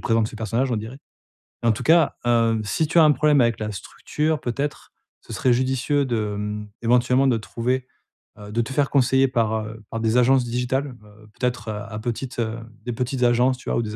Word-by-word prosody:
présentes 115 -1 +1
ce - - -12
personnage, 115 +4 -1
on - - +1
dirait. 110 +6 -6 0.7
En 115 - +4
tout 110 - -3
cas, 165 0 +4
heu, 115 -2 +2
si 125 +10 -1
tu 170 - -1
as 165 - +8
un 150 - +6
problème 150 -1 +3
avec 115 -1 +1
la 105 0 -3
structure, 150 +9 -3
peut-être, 140 +4 -4 0.3
ce - - -10
serait 120 +5 +2
judicieux 130 +3 +1
de, 110 -5 -2
mmh, 105 0 -4 0.2
éventuellement, 125 +3 +3
de 120 -3 +3
trouver 125 +4 -2 0.5
heu, 105 0 -10
de 115 +2 +1
te 115 - -5
faire 145 -1 +1
conseiller 135 0 +3
par, 115 -4 0
heu, 110 0 -10
par 115 - -4
des 110 +1 +1
agences 125 +1 +4
digitales, 125 +3 -2
heu, 105 +1 -18
peut-être 125 -3 -2
heu 110 - -2 0.2
à 110 0 -6
petites 120 +2 -4
heu 115 0 -2 0.3
des 120 - -3
petites 125 +2 -2
agences, 125 +2 +3
tu 130 - -8
vois, - - 0
ou - - +1
des 105 -1 -5
120 Hz, 215 wpm, -23 LUFS, 110-130 Hz, 0.7 s, as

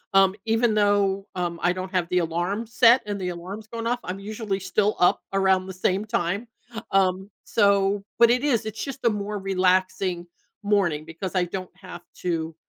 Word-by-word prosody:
um, 195 -1 +6
even 225 0 +2
though, 205 -1 +2
um, 175 -2 -3
I 175 - +3
don't 185 +1 -5
have 180 -2 0
the 180 - +1
alarm 175 +7 -2
set 235 +2 +5
and 205 -2 -4
the 180 - -2
alarm's 190 +5 -7
going 230 0 -6
off, 240 +1 0
I'm 185 +2 -5
usually 210 -1 -4
still 210 +2 0
up 180 - +4
around 190 -1 +2
the 190 - -6
same 185 +2 0
time. 210 0 -2 0.4
Um, 190 0 +1 0.2
so 200 -1 +2 0.2
but 235 0 +7
it 250 +2 +1
is, 240 -7 +1
it's 220 - -5
just 270 -1 -7
a - - +6
more 210 -1 -3
relaxing 185 -1 +1 0.4
morning 190 -7 +1
because 165 +4 -6
I 180 -1 +2
don't 185 +1 -6
have 185 -2 -10 0.2
to, 165 -2 -2
195 Hz, 185 wpm, -24 LUFS, 180-210 Hz, 0.4 s, but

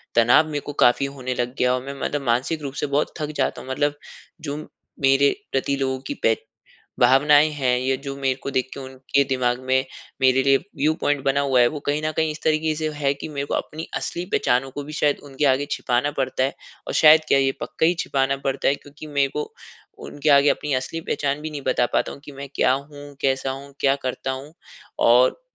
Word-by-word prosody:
तनाव 120 +7 +5
मेरे 145 -2 -3
को 145 - -5
काफ़ी 125 +3 +4
होने 130 -2 -4
लग 125 +1 -2
गया 125 0 +2
और 130 - -3
मैं 140 - -5
मतलब 145 -1 -1
मानसिक 130 +7 0
रूप 140 -2 -5
से 150 - -2
बहुत 150 - 0
थक 150 0 -3
जाता - - -1
हूँ। 130 - -11
मतलब 145 +2 0 0.5
जो 145 -1 -4 0.4
मेरे 135 +1 +4 0.2
प्रति 135 +1 0
लोगों 130 -1 -1
की - - -2
बे - - +4 0.7
भावनाएँ 145 +4 +6
हैं 130 -4 +1
या 130 +1 +1
जो 140 -1 -4
मेरे 135 -1 0
को 140 - -3
देख 130 -1 0
के - - -7
उनके 130 +1 -1
दिमाग 125 -2 0
में 130 +1 +2 0.4
मेरे 130 0 +4
लिए 135 0 +5
व्यू 155 -4 -1
पॉइंट 145 -1 0
बना 140 +1 +2
हुआ 135 -3 +2
है, 120 - +6
वो 150 -2 -6
कहीं 145 +1 0
न 155 - 0
कहीं 160 -1 +1
इस 155 - -8
तरीके 155 0 +1
से 155 0 -2
है 140 -2 +1
कि 140 - -7
मेरे 140 -2 -4
को - - -3
अपनी 160 +2 -4
असली 175 - -3
पहचानों 125 +2 +1
को 145 +2 -6
भी 150 - -9
शायद 150 -1 +1
उनके 140 0 -4
आगे 140 +1 +2
छिपाना 125 +3 0
पड़ता 130 -1 0
है 135 - -1 0.3
और - - -4
शायद 155 0 +7
क्या, 135 - +4
ये 135 0 +2
पक्का 160 - 0
ही 175 - +3
छिपाना 135 0 0
पड़ता 135 0 0
है, 140 - +3
क्योंकि 145 +2 -12
मेरे 140 -2 +1
को 150 - -3 0.5
उनके 145 +1 -1
आगे 140 +1 +6
अपनी 150 - -2
असली 130 +6 -3
पहचान 145 -3 -2
भी 155 - -4
नहीं 145 -2 -6
बता 120 - +2
पाता - - 0
हूँ 140 - -12
कि 145 - -10
मैं 140 0 -8
क्या - - +3
हूँ, 145 +1 -6
कैसा 135 0 0
हूँ, 140 +1 -8
क्या 135 0 +3
करता 130 +1 -3
हूँ 135 +4 -6 0.6
और 125 - +4
140 Hz, 225 wpm, -23 LUFS, 130-145 Hz, 0.7 s, शायद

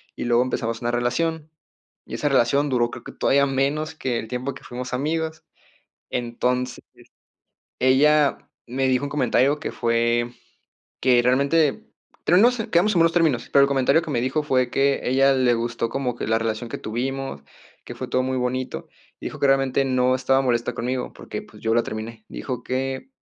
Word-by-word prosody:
y - - -5
luego 120 0 +3
empezamos 115 -2 -3
una 120 0 -1
relación. 150 +6 -1 0.6
Y - - -11
esa 145 - 0
relación 140 +2 +2
duró, 120 -2 +1
creo - - -9
que - - -9
todavía 140 +1 +3
menos 140 +4 -1
que 125 -6 -2
el 110 - -7
tiempo 125 +3 -3
que - - -13
fuimos 125 +1 -6
amigos. 160 +4 -2 0.7
Entonces, 125 +1 -2 1.0
ella 145 +3 +4 0.3
me 130 +2 0
dijo 130 +1 +1
un - - -4
comentario 140 +1 +2
que - - -4
fue 115 +1 +1 0.7
que 125 -2 +4
realmente 140 +4 +2 0.4
pero 180 - +5
no 235 +5 +6
sé, 235 -3 -4
quedamos 185 +5 +3
en 175 - +2
buenos 165 0 +4
términos, 160 -9 +1
pero 140 - +6
el - - +4
comentario 140 +3 +3
que 160 - -5
me 120 - 0
dijo 130 +5 0
fue, 130 -4 +1
que 140 +2 +2
ella 135 +2 +3
le 130 -2 +3
gustó 115 0 -2
como 125 -1 -2
que 120 - -5
la 115 0 +2
relación 115 +1 -3
que - - -4
tuvimos, 130 - -4 0.4
que - - -8
fue - - -5
todo 130 - +1
muy 130 0 -1
bonito. 125 +1 -3 0.3
Dijo - - -7
que 140 - +3
realmente 135 0 +2
no 130 -1 +2
estaba 135 +1 +2
molesta 120 -2 0
conmigo 125 +2 -3
porque, - - -7
pues, - - -16
yo 110 0 +1
la 120 - +4
terminé. 110 +1 -7
Dijo 125 -2 -5
que 130 - -3
130 Hz, 185 wpm, -23 LUFS, 120-140 Hz, 1.0 s, no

